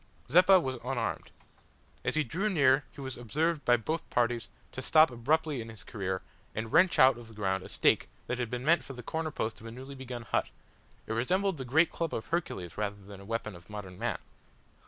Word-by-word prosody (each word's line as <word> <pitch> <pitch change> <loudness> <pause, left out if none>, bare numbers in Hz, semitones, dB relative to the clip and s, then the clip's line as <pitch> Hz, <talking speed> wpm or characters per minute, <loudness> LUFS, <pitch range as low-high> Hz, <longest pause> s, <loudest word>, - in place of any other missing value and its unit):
Zeppa 185 +4 +7
was 130 -6 -3
unarmed. 120 -3 -2 0.7
As - - -1
he 155 - +3
drew 185 - -1
near 135 -6 +4
he 140 - -10
was 130 -1 -5
observed 150 +7 0
by 120 0 +5
both 155 +8 -3
parties 120 -1 0 0.2
to 130 - -6
stop 155 +2 +6
abruptly 145 +3 0
in 115 - -8
his 110 -2 -11
career, 95 -3 -3 0.3
and 110 0 -4
wrench 180 +1 +5
out 130 -2 +6
of 120 - -11
the 110 - -14
ground 95 -2 0
a - - -10
stake - - +2 0.2
that 125 - -3
had 120 -2 -1
been 125 +2 -4
meant 170 +3 +4
for 135 - -8
the 125 -1 -9
corner 160 +5 -2
post 110 -7 -3
of 115 - -9
a - - -7
newly 130 +4 -9
begun 130 -3 -7
hut. - - 0 0.6
It - - -3
resembled 185 - +1
the 130 - -5
great 160 +7 +4
club 165 -2 -2
of 110 - -4
Hercules 105 - -3
rather 105 -1 -1
than 100 -1 -12
a - - -12
weapon 115 -2 -3
of 85 +2 -15
modern 100 -3 -8
man. - - -1
125 Hz, 220 wpm, -30 LUFS, 110-155 Hz, 0.7 s, Zeppa